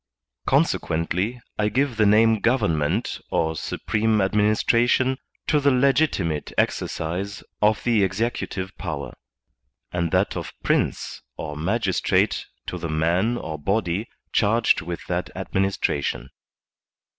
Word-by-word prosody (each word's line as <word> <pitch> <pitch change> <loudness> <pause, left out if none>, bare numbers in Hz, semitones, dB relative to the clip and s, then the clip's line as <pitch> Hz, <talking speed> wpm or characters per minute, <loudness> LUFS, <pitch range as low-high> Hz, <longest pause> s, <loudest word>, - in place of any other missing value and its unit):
Consequently, 90 +9 +1 0.2
I 105 0 +2
give 130 +1 0
the 110 -1 +4
name 110 +1 +5
government 90 - +1
or 80 0 0
supreme 110 +6 0
administration 115 +6 +2 0.3
to 150 - +3
the 140 0 +3
legitimate 130 - +2
exercise 95 +5 -1 0.2
of 105 0 +3
the 115 -4 +3
executive 95 -1 -2
power, 80 -5 -4 0.8
and 85 -1 -1
that - - +1
of - - -5
Prince - - 0 0.2
or 75 -2 -5
magistrate 95 +5 +1 0.2
to - - -5
the 85 - -4
man 85 +9 +1
or 80 -9 -5
body 100 +4 -1 0.2
charged 110 +2 +3
with 85 0 -6
that - - -2
administration. 70 -9 -1
100 Hz, 110 wpm, -24 LUFS, 85-115 Hz, 0.8 s, name